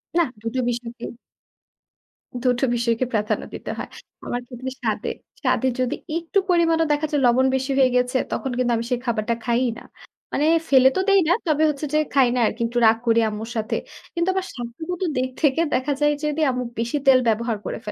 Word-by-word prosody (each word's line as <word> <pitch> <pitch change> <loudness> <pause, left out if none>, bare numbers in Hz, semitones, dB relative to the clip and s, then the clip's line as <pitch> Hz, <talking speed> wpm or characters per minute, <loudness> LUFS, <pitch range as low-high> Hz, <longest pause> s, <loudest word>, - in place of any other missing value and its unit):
নাহ 340 -5 +3
দুটো 230 +3 -3
বিষয়কে 240 0 -5 1.4
দুটো 250 0 +2
বিষয়কে 235 +1 0
প্রাধান্য 215 -1 0
দিতে - - -6
হয়। - - -5 0.4
আমার 245 - -2
ক্ষেত্রে 255 +1 -6
স্বাদে। - - -1 0.3
স্বাদে 260 - +1
যদি 255 -1 0 0.2
একটু 340 +3 -2
পরিমাণও 330 -2 +3
দেখা 295 +1 +1
যায়, 290 -2 +1
লবণ 245 +2 +4
বেশি 265 +1 -1
হয়ে 265 -2 +5
গেছে, 250 +1 +2
তখন 265 - -2
কিন্তু 250 -1 +1
আমি 230 - -3
সেই 250 - +1
খাবারটা 235 -1 0
খাই-ই 240 +1 +2
না। - - -14 0.5
মানে 295 - +1 0.2
ফেলে 265 -1 +7
তো - - +3
দেই 395 -1 +6
না। - - +6
তবে 310 0 +2
হচ্ছে 300 0 -3
যে - - +4 0.2
খাই 270 -2 +5
না - - +1
আরকি। 230 - -5
একটু 240 +1 -5
রাগ 220 +1 +4
করি 230 0 +4
আম্মুর 215 +2 -6
সাথে। 220 +1 -1 0.4
কিন্তু 340 +2 +1
আমার 380 0 -1
স্বাস্থ্যগত 295 +10 -6 0.2
দিক 255 0 0
থেকে 295 +1 +3
দেখা 285 +3 +1
যায় 295 0 +4
যদি 300 +1 -1
আম্মু 250 0 -2 0.2
বেশি 235 +5 -1
তেল 260 -1 +7
ব্যবহার 225 0 +1
করে। - - -3
255 Hz, 190 wpm, -23 LUFS, 235-295 Hz, 1.4 s, ফেলে